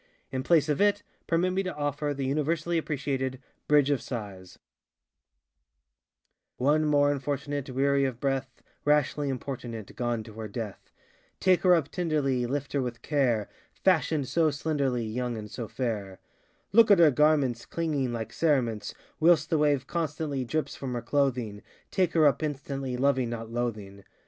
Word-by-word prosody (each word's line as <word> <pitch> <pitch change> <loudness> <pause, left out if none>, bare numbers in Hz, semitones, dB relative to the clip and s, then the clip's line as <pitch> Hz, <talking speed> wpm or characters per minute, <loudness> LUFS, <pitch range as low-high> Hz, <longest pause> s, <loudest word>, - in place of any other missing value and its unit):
In 130 -1 -2
place 160 +1 +3
of 150 +2 0
it 205 0 +3 0.2
permit 170 +2 +2
me 190 - +1
to 185 -4 -4
offer 145 0 -2
the 140 -1 -3
universally 155 +4 0
appreciated 135 -4 -2 0.3
ŌĆ£Bridge 145 -1 +5
of 140 - -1
SighsŌĆØ:ŌĆö 100 -7 -7 2.0
One 150 +4 +2
more 145 -1 +4
Unfortunate, 140 0 -3
Weary 140 +1 +2
of 125 -3 -3
breath, 135 -2 -2 0.2
Rashly 145 -1 +2
importunate 120 -5 -6
Gone 120 -2 -1
to 110 0 -12
her 110 - -4
death! 105 -1 -7 0.5
Take 185 -1 +3
her 180 -1 +6
up 155 -4 0
tenderly, 145 -8 0
Lift 140 +2 -3
her 140 - +1
with 120 -2 -5
care; 125 -8 +1 0.3
ŌĆö - - -32 0.2
FashionŌĆÖd 150 -3 -2
so 160 +4 +2
slenderly, 140 -5 -1
Young 120 +1 -3
and 105 -1 -8
so 115 0 -5
fair! 105 -7 -3 0.5
Look 225 +1 +6
at 200 - +7
her 165 -3 +7
garments 140 -4 +2
Clinging 150 -6 -1
like 115 -1 -5
cerements; 125 -9 0 0.2
Whilst 160 0 +4
the 160 - +3
wave 145 -3 +2
constantly 150 -4 -2
Drips 155 +6 -2
from 130 -2 -5
her 120 -1 -3
clothing; 125 -6 0 0.3
Take 185 -3 +1
her 160 -2 +4
up 140 -2 +3
instantly, 135 -3 -3
Loving 130 -2 +2
not 115 -1 -6
loathing. 105 -5 -4
140 Hz, 160 wpm, -28 LUFS, 120-150 Hz, 2.0 s, at